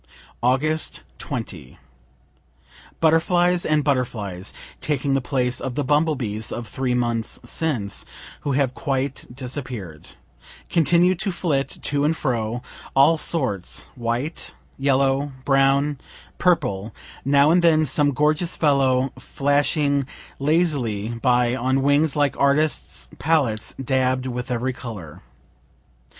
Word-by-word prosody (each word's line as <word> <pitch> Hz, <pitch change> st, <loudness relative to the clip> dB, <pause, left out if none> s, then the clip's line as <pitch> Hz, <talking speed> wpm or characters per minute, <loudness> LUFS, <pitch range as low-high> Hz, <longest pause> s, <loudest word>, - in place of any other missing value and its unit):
Aug. 145 Hz, +6 st, +1 dB, 0.2 s
20. 95 Hz, -, -6 dB, 1.2 s
Butterflies 175 Hz, +2 st, +3 dB
and 155 Hz, -1 st, +2 dB
butterflies, 110 Hz, -9 st, -2 dB, 0.3 s
(taking 140 Hz, -2 st, -1 dB
the 135 Hz, -, +2 dB
place 125 Hz, -1 st, 0 dB
of 130 Hz, -2 st, -4 dB
the 145 Hz, -, 0 dB
bumble 150 Hz, +3 st, +2 dB
bees 110 Hz, -4 st, -3 dB
of 120 Hz, -1 st, -5 dB
three 130 Hz, -2 st, -1 dB
months 120 Hz, -2 st, -1 dB
since, 120 Hz, -12 st, -1 dB, 0.4 s
who 140 Hz, -, -2 dB
have 130 Hz, -2 st, +1 dB
quite 135 Hz, 0 st, -2 dB
disappear'd,) 125 Hz, -, -6 dB, 0.6 s
continue 170 Hz, +3 st, +4 dB
to 195 Hz, +2 st, -2 dB
flit 155 Hz, -6 st, 0 dB, 0.2 s
to 145 Hz, 0 st, 0 dB
and 155 Hz, +2 st, +1 dB
fro, 120 Hz, -3 st, -2 dB, 0.3 s
all 140 Hz, +5 st, +6 dB
sorts, 100 Hz, -, 0 dB
white, 120 Hz, +6 st, -3 dB, 0.2 s
yellow, 135 Hz, +1 st, +1 dB
brown, 135 Hz, +1 st, +3 dB, 0.4 s
purple 105 Hz, -, +1 dB, 0.3 s
now 140 Hz, +2 st, +4 dB
and 175 Hz, +1 st, +4 dB
then 155 Hz, -2 st, +5 dB
some 145 Hz, +1 st, +2 dB
gorgeous 150 Hz, +5 st, +1 dB
fellow 135 Hz, -3 st, +2 dB
flashing 140 Hz, 0 st, +1 dB, 0.3 s
lazily 140 Hz, -, +1 dB
by 125 Hz, -1 st, +3 dB
on 130 Hz, +2 st, 0 dB
wings 145 Hz, +2 st, +3 dB
like 145 Hz, -2 st, +2 dB
artists' 145 Hz, +2 st, +1 dB
palettes 140 Hz, -9 st, +1 dB
dabb'd 130 Hz, -1 st, 0 dB
with 125 Hz, 0 st, -4 dB
every 125 Hz, +1 st, -1 dB
color. 100 Hz, -12 st, -8 dB
135 Hz, 115 wpm, -23 LUFS, 125-150 Hz, 1.2 s, all